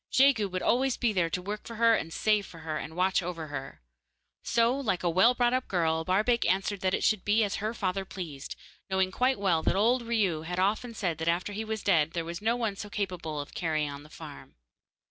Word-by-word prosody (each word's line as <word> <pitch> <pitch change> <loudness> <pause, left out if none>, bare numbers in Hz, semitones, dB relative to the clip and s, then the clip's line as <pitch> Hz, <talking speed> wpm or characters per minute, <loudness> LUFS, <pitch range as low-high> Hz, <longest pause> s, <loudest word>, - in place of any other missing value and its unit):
Jegu 260 -6 +4
would 185 0 -3
always 260 +1 +2
be 235 -3 +1
there 175 -4 +1
to 180 +2 -3
work 210 +2 -5
for 230 - -7
her 230 +1 +5
and 165 -6 -1
save 210 +2 +1
for 165 - -12
her, 155 -1 -3
and 160 - -7
watch 185 +2 +2
over 165 -3 -5
her. 135 - -7 0.6
So, 235 +2 +2
like 215 -11 -1
a 175 - +2
well 225 +9 +5
brought 245 0 +2
up 255 0 0
girl, 160 -3 +1
Barbaik 215 +7 +2
answered 195 +1 0
that 185 0 +1
it - - -3
should 215 -3 +2
be 215 +2 +3
as 205 - -1
her 215 +1 -2
father 195 -2 -1
pleased, 160 -7 -7 0.3
knowing 190 0 +1
quite 255 +5 +1
well 180 -5 +2
that - - +1
old 235 +6 +3
Riou 215 -9 0
had 175 +2 -4
often 215 +5 0
said 175 -7 -2
that 160 - -3
after 175 +4 0
he 215 +2 -3
was 220 -1 -4
dead 165 -5 +2
there 170 -1 -2
was 170 +2 -6
no 225 +2 +2
one 225 -4 -1
so 205 +1 -7
capable 180 -7 -3
of 145 - -7
carrying 155 -3 -1
on 140 0 -8
the 150 - -15
farm. - - -11
190 Hz, 235 wpm, -29 LUFS, 165-220 Hz, 0.6 s, her